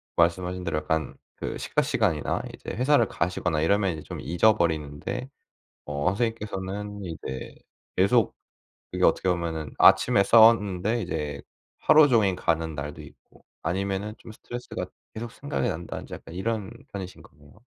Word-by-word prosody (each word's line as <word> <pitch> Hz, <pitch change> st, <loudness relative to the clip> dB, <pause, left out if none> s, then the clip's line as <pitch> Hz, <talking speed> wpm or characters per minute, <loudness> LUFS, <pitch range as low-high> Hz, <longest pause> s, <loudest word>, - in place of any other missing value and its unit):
말씀하신 90 Hz, +2 st, +1 dB
대로 75 Hz, -, -1 dB
약간 80 Hz, -1 st, -2 dB, 0.2 s
그 -, -, -4 dB
식사 -, -, 0 dB
시간이나 75 Hz, -2 st, 0 dB
이제 -, -, -9 dB
회사를 125 Hz, -1 st, +3 dB
가시거나 85 Hz, -3 st, -1 dB
이러면 95 Hz, +2 st, +2 dB
이제 80 Hz, -, -7 dB
좀 -, -, -7 dB
잊어버리는데 85 Hz, -, +1 dB, 0.6 s
어 75 Hz, +2 st, -2 dB
선생님께서는 105 Hz, -1 st, -3 dB
이제 75 Hz, -6 st, -6 dB, 0.4 s
계속 105 Hz, +4 st, +3 dB, 0.6 s
그게 -, -, 0 dB
어떻게 95 Hz, -, +3 dB
보면은 85 Hz, -3 st, -1 dB
아침에 100 Hz, -, +6 dB
싸웠는데 110 Hz, -1 st, +5 dB
이제 75 Hz, -6 st, -3 dB, 0.4 s
하루 155 Hz, -1 st, +6 dB
종일 110 Hz, -7 st, +3 dB
가는 80 Hz, -2 st, 0 dB
날도 75 Hz, 0 st, -6 dB
있고 -, -, -18 dB, 0.2 s
아니면은 100 Hz, +4 st, -2 dB
좀 110 Hz, -, -11 dB
스트레스가 120 Hz, +3 st, -6 dB, 0.3 s
계속 115 Hz, +1 st, -5 dB
생각이 140 Hz, 0 st, -2 dB
난다든지 85 Hz, -4 st, -5 dB
약간 80 Hz, -, -11 dB
이런 105 Hz, +1 st, -2 dB, 0.2 s
편이신 95 Hz, -2 st, -7 dB
거네요. 70 Hz, +1 st, -19 dB
95 Hz, 350 characters per minute, -26 LUFS, 80-110 Hz, 0.6 s, 아침에